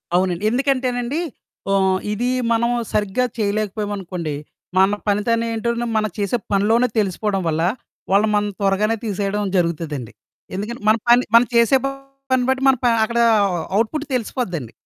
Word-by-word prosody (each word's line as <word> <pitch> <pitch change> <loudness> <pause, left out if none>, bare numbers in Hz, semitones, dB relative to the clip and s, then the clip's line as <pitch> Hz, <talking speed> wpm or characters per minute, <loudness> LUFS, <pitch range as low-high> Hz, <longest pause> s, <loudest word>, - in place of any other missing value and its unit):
అవునండి. 180 +1 +1
ఎందుకంటేనండి 255 +2 0 0.5
ఓహ్, 190 -1 +3
ఇది 240 +4 -1 0.2
మనం 235 +1 +2 0.2
సరిగ్గా 210 +4 0
చేయలేకపోయామనుకోండి, 200 -5 -2 0.4
మన 195 +2 +4
పనితనం 230 +3 +1
ఎంటో 235 +2 -1 0.3
మనం 215 -2 0
చేసే 205 +4 0
పనిలోనే 220 +5 +3
తెలిసిపోవడం 195 0 -1
వల్ల, 160 0 0 0.5
వాళ్ళు 205 +2 +4
మనని 205 -1 0
త్వరగానే 205 +3 +2
తీసేయడం 200 -1 -2
జరుగుతదండి. 160 -8 -2 0.4
ఎందుకంటే 215 +4 -5
మన 220 - +6
పని 245 +1 +6
మనం 235 0 +6
చేసే 235 +3 +5 0.5
పని 255 -1 +3
బట్టి 265 0 +1
మనం 260 -2 +4
ప - - +6 0.2
అక్కడ 235 +1 -2 0.6
అవుట్ 220 +1 +2
పుట్ 305 0 -3
తెలిసిపోద్దండి. 180 - -3
210 Hz, 135 wpm, -20 LUFS, 195-235 Hz, 0.6 s, మన